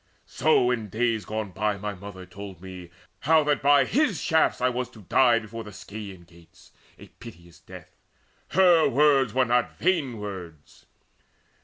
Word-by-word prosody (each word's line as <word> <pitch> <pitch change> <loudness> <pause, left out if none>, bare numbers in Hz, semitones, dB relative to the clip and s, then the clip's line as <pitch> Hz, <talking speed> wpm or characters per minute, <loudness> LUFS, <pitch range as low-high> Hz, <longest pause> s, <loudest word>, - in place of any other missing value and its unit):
So 140 -5 +2
in 115 -4 -3
days 115 0 -1
gone 110 -2 -4
by 105 +2 -1
My 105 +1 -5
mother 95 -1 -10
told 95 0 -10
me 90 -1 -10 0.3
how 160 +1 +3
that 145 -1 0
by 140 -1 +5
his 235 - +1
shafts 160 0 +1
I 125 - +2
was 125 0 -2
to 110 - -15
die 120 +6 +4
before 115 0 -7
the 105 - -10
Scaean 100 -2 -10
Gates 85 -1 -21 0.3
A - - -14
piteous 85 -7 -14
death. 90 -2 -13 0.6
Her 175 -2 +4
words 135 -3 +3
were 130 -1 +3
not 120 0 0
vain 155 -10 0
words." 90 -7 -10
110 Hz, 160 wpm, -25 LUFS, 95-135 Hz, 0.6 s, by